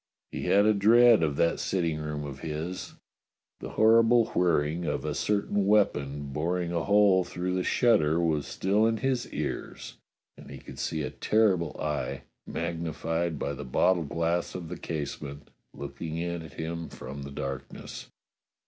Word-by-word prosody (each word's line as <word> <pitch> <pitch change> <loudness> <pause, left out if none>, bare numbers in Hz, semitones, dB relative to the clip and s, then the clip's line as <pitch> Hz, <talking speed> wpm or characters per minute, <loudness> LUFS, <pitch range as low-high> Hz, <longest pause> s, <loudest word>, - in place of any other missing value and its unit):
He - - -4
had 100 +1 +4
a 110 - +5
dread 115 +2 +6
of 75 -3 +1
that 85 +3 +1
sitting 85 -5 -1
room 75 -1 -4
of 70 -2 -7
his. 80 +3 -5 0.6
The - - -7
horrible 115 +1 +5
whir 85 -4 +3
ring 80 +4 -3
of 75 - -2
a 75 - -1
certain 100 +3 0
weapon 70 -9 +1
boring 85 +3 -1
a 85 -1 -1
whole 100 -2 +5
through 90 +1 -3
the 90 0 0
shutter 90 -11 +3
was 80 -4 0
still 105 +4 +2
in 115 0 +1
his 130 0 -1
ears, - - -5 0.4
and - - -12
he - - -8
could - - -11
see 80 -2 -2
a - - -4
terrible 95 -7 +1
eye, 75 -2 -3 0.2
magnified 80 0 -2
by 70 - -2
the 70 - -6
bottle 85 +7 +2
glass 85 +3 -1
of 85 -3 -6
the 90 - -5
casement, 70 -2 -6 0.2
looking 80 0 -6
in 85 0 -3
at 80 -3 -11
him 85 +1 -5
from 65 +2 -8
the 70 - -7
darkness. 70 -1 -6
85 Hz, 165 wpm, -28 LUFS, 75-100 Hz, 0.6 s, dread